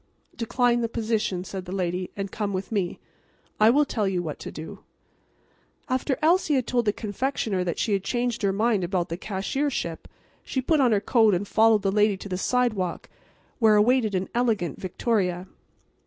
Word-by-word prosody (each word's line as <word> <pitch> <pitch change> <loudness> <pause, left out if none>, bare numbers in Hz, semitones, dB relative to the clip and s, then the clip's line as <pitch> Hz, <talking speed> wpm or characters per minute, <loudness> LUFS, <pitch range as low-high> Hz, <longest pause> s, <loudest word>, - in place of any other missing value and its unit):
"Decline 240 0 +1
the 230 - -1
position," 220 -5 -1
said 190 0 -6
the 180 - -8
lady, 180 -1 -2
"and 195 -1 -4
come 205 -2 -3
with 190 +3 -4
me. 195 -5 -1 0.6
I 215 +1 +6
will 290 +5 +4
tell 215 -6 -1
you 180 -2 -1
what 155 -3 -5
to - - -7
do." 160 +6 -8 1.1
After 260 +1 0
Elsie 330 -2 +3
had 255 -3 +1
told 240 0 0
the 210 - +3
confectioner 215 -2 -2
that 175 -2 -2
she 215 - 0
had 195 -1 0
changed 240 +1 -1
her 200 -2 +2
mind 210 0 +1
about 175 -1 -1
the 165 - -3
cashiership 200 - -3 0.4
she 265 - -3
put 300 +4 +2
on 255 -3 +4
her 205 -2 +2
coat 220 -4 +4
and 200 +3 -3
followed 220 -1 +4
the 195 - +1
lady 210 -1 +3
to 200 - -8
the 185 - -2
sidewalk, 215 -7 0 0.5
where 220 -3 +5
awaited 220 -1 +3
an 185 +1 -1
elegant 220 - 0
victoria. 185 -2 -1
210 Hz, 185 wpm, -25 LUFS, 190-240 Hz, 1.1 s, I